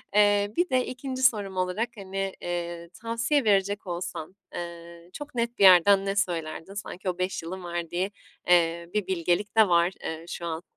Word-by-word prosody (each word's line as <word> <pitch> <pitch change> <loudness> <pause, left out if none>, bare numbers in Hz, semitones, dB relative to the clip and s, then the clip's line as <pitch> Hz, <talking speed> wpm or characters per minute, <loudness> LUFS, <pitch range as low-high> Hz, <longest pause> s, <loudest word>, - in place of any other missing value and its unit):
eee, 205 0 +4
bir 350 0 +2
de 255 -1 +2
2'nci 260 +1 -5
sorum 205 -7 +2
olarak, 185 +6 0
hani, 195 -1 -4
eee, 170 -1 -4
tavsiye 230 +5 +1
verecek 200 -1 +1
olsan, 175 0 -5 0.2
eee, 170 0 -8
çok 290 +2 -8
net 235 0 -1
bir - - +4
yerden 195 +1 +7
ne 195 0 -1
söylerdin? 170 -2 -2
Sanki 195 -2 -5
o 180 - -3
5 185 -1 -2
yılın 185 +3 -6
verdiği, 175 +2 -3 0.4
eee, 170 -1 +3
bir 210 -3 -1
bilgelik 185 +3 0
de 220 -2 +7
var, 170 0 +4
eee, 160 +1 -5
şu 170 - -6
an 165 0 -4
185 Hz, 175 wpm, -27 LUFS, 170-210 Hz, 0.4 s, yerden